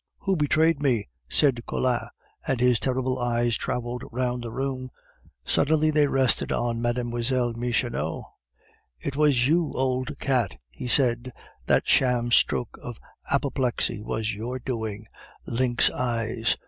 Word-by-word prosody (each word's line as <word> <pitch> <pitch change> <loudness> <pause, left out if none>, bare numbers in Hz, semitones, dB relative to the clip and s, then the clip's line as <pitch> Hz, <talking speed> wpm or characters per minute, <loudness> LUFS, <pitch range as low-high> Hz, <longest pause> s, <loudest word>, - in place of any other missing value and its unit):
"Who 195 -1 +1
betrayed 155 0 +2
me?" 125 -7 +1 0.2
said 130 - +3
Collin, 125 -2 -1 0.4
and 130 - 0
his 125 -1 +3
terrible 130 0 -1
eyes 120 -1 +1
traveled 120 0 -3
round 125 0 -1
the 115 - -5
room. 130 0 -3 0.6
Suddenly 155 +1 +3
they 150 -1 +3
rested 135 -2 +2
on 120 -1 -1
Mlle. 120 0 0
Michonneau. 115 - -2 0.8
"It 135 - -4
was 140 -4 +3
you, 165 0 +2
old 130 +2 -1
cat!" 125 - 0
he 125 - -7
said. 125 -1 +2 0.4
"That - - +2
sham 120 -2 +3
stroke 120 -1 +2
of 120 -2 -7 0.3
apoplexy 135 -6 0
was 110 0 -2
your 115 +5 -4
doing, 110 -4 -4 0.4
lynx 120 0 +3
eyes!... 115 -2 -1
125 Hz, 130 wpm, -25 LUFS, 120-135 Hz, 0.8 s, said